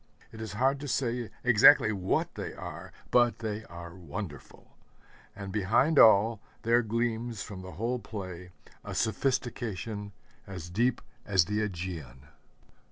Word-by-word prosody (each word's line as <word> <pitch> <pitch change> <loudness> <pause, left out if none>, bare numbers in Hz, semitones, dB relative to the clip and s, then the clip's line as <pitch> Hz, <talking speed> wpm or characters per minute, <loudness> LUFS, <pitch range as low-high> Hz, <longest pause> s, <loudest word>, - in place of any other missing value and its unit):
It 110 - -9
is 110 -4 -5
hard 135 +6 +2
to 145 - -6
say 120 -3 -1
exactly 120 0 +7
what 95 -3 -1
they - - -5
are, - - -8 0.2
but 120 -1 +4
they 110 -1 -4
are 85 0 -9
wonderful. 85 -3 -8 0.6
And 100 -1 -7
behind 110 +10 +3
all, 110 0 +6 0.2
there 120 +1 +4
gleams 115 0 -2
from 95 -3 -8
the 95 -1 -9
whole 120 +8 -2
play 95 -5 -7 0.3
a - - -6
sophistication 110 -4 -2 0.4
as 90 -4 -7
deep 120 +6 +1 0.2
as 95 -4 +3
the 105 +4 -1
Ægean. 85 - -5
105 Hz, 135 wpm, -29 LUFS, 95-120 Hz, 0.6 s, exactly